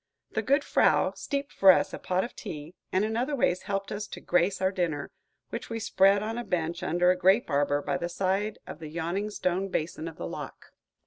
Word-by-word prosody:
The 220 - 0
good 280 +6 +2
frau - - +3
steeped 280 0 -4
for 195 -1 +8
us - - +1
a - - -5
pot 185 +1 0
of 240 - -7
tea, 160 -5 -7 0.2
and 190 +3 +2
in 220 +1 -2
other 260 +5 0
ways 185 -8 +1
helped 195 0 -2
us 210 0 -4
to - - -8
grace 180 +2 +1
our 190 0 +2
dinner, 170 -7 -2 0.4
which - - -5
we 230 0 -3
spread 200 -2 +4
on 225 +2 -3
a - - -3
bench 170 -3 -2
under 180 0 +3
a - - +2
grape 190 +1 +3
arbor, 145 0 +1
by - - -1
the 170 - -3
side 195 +4 -1
of - - -8
the 155 -2 -7
yawning 175 +6 -2
stone 190 -1 -1
basin 160 -1 -3
of 165 - -8
the - - -5
lock. 85 - -8
190 Hz, 220 wpm, -28 LUFS, 170-210 Hz, 0.4 s, for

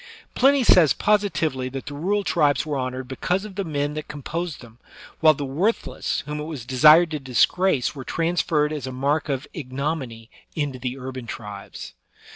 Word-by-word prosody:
Pliny 275 +1 +4
says 170 - +6
i)ositively 165 -11 0
that 135 - -5
the 145 - -7
rural 195 +8 0
tribes 150 -7 +2
were 150 -2 -2
honored 130 -1 -3
because 180 +9 -1
of 210 - -9
the 200 +1 -3
men 145 -3 -2
that 155 0 -6
composed 160 +3 -5
them, 120 -1 -15 0.4
while 155 -2 +6
the 140 - -4
worthless 175 +12 -1
whom 150 +1 -5
it 150 - -4
was 150 -7 -7
desired 155 +6 +6
to 155 - -2
dis 130 -3 +3
grace 180 -8 0
were 135 -3 -8
transferred 165 -1 0
as 145 -4 -4
a - - -4
mark 140 +4 -1
of 135 0 -2
ignominy 130 -5 -4 0.2
into 145 -4 -2
the 125 +1 -4
urban 130 -2 -7
tribes. 105 -3 -8
145 Hz, 180 wpm, -23 LUFS, 130-165 Hz, 0.4 s, says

